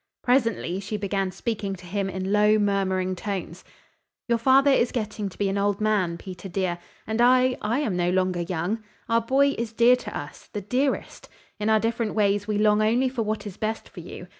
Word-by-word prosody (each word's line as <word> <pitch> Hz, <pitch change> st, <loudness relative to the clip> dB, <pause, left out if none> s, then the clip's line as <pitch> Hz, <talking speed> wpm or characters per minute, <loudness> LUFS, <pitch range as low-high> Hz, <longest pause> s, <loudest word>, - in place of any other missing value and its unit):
Presently 230 Hz, -8 st, +1 dB
she 205 Hz, +2 st, -4 dB
began 195 Hz, -1 st, -1 dB
speaking 205 Hz, 0 st, -3 dB
to 180 Hz, -1 st, -14 dB
him 195 Hz, +2 st, -2 dB
in 190 Hz, 0 st, -3 dB
low, 210 Hz, +1 st, +4 dB
murmuring 190 Hz, -2 st, 0 dB
tones: 185 Hz, -3 st, -5 dB, 0.6 s
"Your 235 Hz, -1 st, +2 dB
father 270 Hz, +4 st, +5 dB
is 245 Hz, -3 st, +3 dB
getting 215 Hz, -3 st, -3 dB
to -, -, -16 dB
be 200 Hz, -, 0 dB
an 195 Hz, +1 st, -1 dB
old 200 Hz, 0 st, +1 dB
man, 205 Hz, -6 st, +1 dB
Peter, 185 Hz, +1 st, -9 dB
dear, 180 Hz, -1 st, -1 dB, 0.3 s
and 220 Hz, +2 st, -1 dB
I 255 Hz, +1 st, +5 dB
I 235 Hz, +7 st, 0 dB
am 220 Hz, -11 st, -1 dB
no 175 Hz, 0 st, +1 dB
longer 185 Hz, -1 st, +1 dB
young. 180 Hz, +6 st, -2 dB, 0.2 s
Our 230 Hz, 0 st, +2 dB
boy 270 Hz, +5 st, +3 dB
is 230 Hz, -1 st, -3 dB
dear 235 Hz, +2 st, +6 dB
to -, -, -6 dB
us -, -, -9 dB
the 205 Hz, -, -3 dB
dearest. 255 Hz, +7 st, -2 dB, 0.3 s
In 210 Hz, +1 st, 0 dB
our 220 Hz, 0 st, +5 dB
different 225 Hz, -1 st, -1 dB
ways 205 Hz, -1 st, +1 dB
we 210 Hz, -1 st, 0 dB
long 210 Hz, 0 st, +3 dB
only 240 Hz, +5 st, +2 dB
for 250 Hz, -2 st, -3 dB
what 215 Hz, -1 st, -2 dB
is 200 Hz, -2 st, -7 dB
best 220 Hz, +1 st, -3 dB
for -, -, -11 dB
you. -, -, -9 dB
210 Hz, 205 wpm, -25 LUFS, 190-230 Hz, 0.6 s, dear